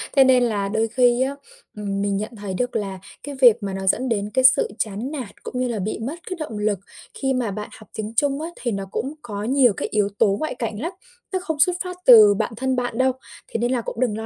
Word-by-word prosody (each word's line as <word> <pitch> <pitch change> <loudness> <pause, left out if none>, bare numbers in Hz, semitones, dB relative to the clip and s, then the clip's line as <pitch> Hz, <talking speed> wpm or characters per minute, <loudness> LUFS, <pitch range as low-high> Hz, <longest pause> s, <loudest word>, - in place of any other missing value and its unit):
Thế 270 - +8
nên 255 -1 +5
là 210 -4 0
đôi 220 +2 +1
khi 245 +1 +3
á, 270 +2 0 0.4
ừm, 200 -1 -3
mình 200 -1 0
nhận 215 +3 -5
thấy 205 -3 -5
được 245 +6 -2
là 195 -3 -3 0.2
cái 285 -1 -6
việc 235 -3 +6
mà 195 -1 -3
nó 190 0 -4
dẫn 255 +7 +2
đến 205 -2 -1
cái 260 - +2
sự 260 +1 +6
chán 220 +5 -3
nản 260 -9 -5
cũng 250 - -5
như 255 - +1
là 235 -3 -2
bị 210 +3 -3
mất 255 +8 -4
cái 370 - -4
động 265 -9 -5
lực 210 -2 0 0.3
khi 265 -1 -1
mà 245 -5 -1
bạn 210 +1 -6
học 215 - -16
tiếng 215 0 -4
Trung 280 +3 +1
á, 325 - -4
thì 240 -1 -1
nó 195 -2 -3
cũng 270 +6 -3
có 205 -3 -5
nhiều 250 -1 +4
cái - - -3
yếu 205 -2 +2
tố 200 -1 +4
ngoại 310 - -3
cảnh 220 -3 -4
lắm, 335 +5 -2 0.4
nó 375 - +1
không 320 -4 -4
xuất 355 +5 +5
phát 360 -1 -6
từ 215 -5 +9
bản 200 - -2
thân 260 +1 0
bạn 245 -2 -2
đâu, 260 +1 +3 0.4
thế - - -3
nên 240 +2 0
là 250 -2 +1
cũng 225 - -6
đừng 240 -4 0
lo 220 - -5
235 Hz, 265 wpm, -22 LUFS, 210-260 Hz, 0.4 s, từ